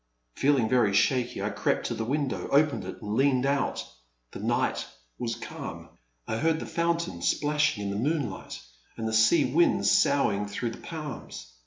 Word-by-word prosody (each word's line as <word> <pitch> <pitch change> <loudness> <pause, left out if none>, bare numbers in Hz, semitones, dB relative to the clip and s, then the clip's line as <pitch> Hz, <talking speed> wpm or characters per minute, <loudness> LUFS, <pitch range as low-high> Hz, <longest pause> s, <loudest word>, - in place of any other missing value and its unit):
Feeling 135 -5 +3
very 110 -4 +3
shaky, 125 +4 +1
I - - -1
crept - - 0
to - - -1
the 115 - -3
window, 140 +3 -2
opened 140 -7 +2
it, 95 - -8
and 105 - -3
leaned 130 +1 +3
out. 140 0 0 0.5
The - - -8
night - - 0 0.4
was 115 -1 -2
calm. - - -8 0.4
I 110 - -1
heard 160 +4 +1
the - - -5
fountain 170 0 -1
splashing 150 -6 +1
in 100 - -2
the 110 +9 0
moonlight 140 -12 -3 0.4
and 110 - -3
the 110 - -2
sea 110 +8 +5
winds 145 -11 +4
soughing 105 -8 +3
through 115 +3 -3
the - - -10
palms. 145 - -7
130 Hz, 170 wpm, -27 LUFS, 110-150 Hz, 0.5 s, sea